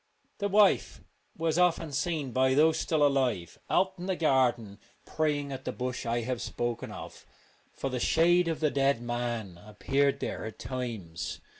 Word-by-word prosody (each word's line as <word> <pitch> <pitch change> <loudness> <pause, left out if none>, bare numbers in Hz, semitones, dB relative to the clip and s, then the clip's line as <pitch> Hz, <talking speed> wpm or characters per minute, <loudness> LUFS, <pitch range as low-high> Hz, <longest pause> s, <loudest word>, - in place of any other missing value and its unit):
The 200 - 0
wife 205 0 +3 0.4
was 165 +1 0
often 170 -3 +2
seen 150 -1 -2
by 130 +1 +2
those 155 +2 +4
still 155 -3 +2
alive 125 - 0
out 190 0 +2
in 180 - -5
the 190 - 0
garden 120 - +1 0.3
praying 145 -2 -1
at 135 - -6
the - - -3
bush 125 -1 -4
I 120 +1 0
have 125 +1 -3
spoken 120 -1 -3
of, - - -9 0.5
for 135 - -4
the 125 - -2
shade 175 +6 +3
of 165 -1 -2
the 155 -2 +2
dead 140 -2 +2
man 120 -6 -4
appeared 135 +7 0
there - - -4
at 110 - -7
times. 110 -11 -5
135 Hz, 165 wpm, -29 LUFS, 120-160 Hz, 0.5 s, those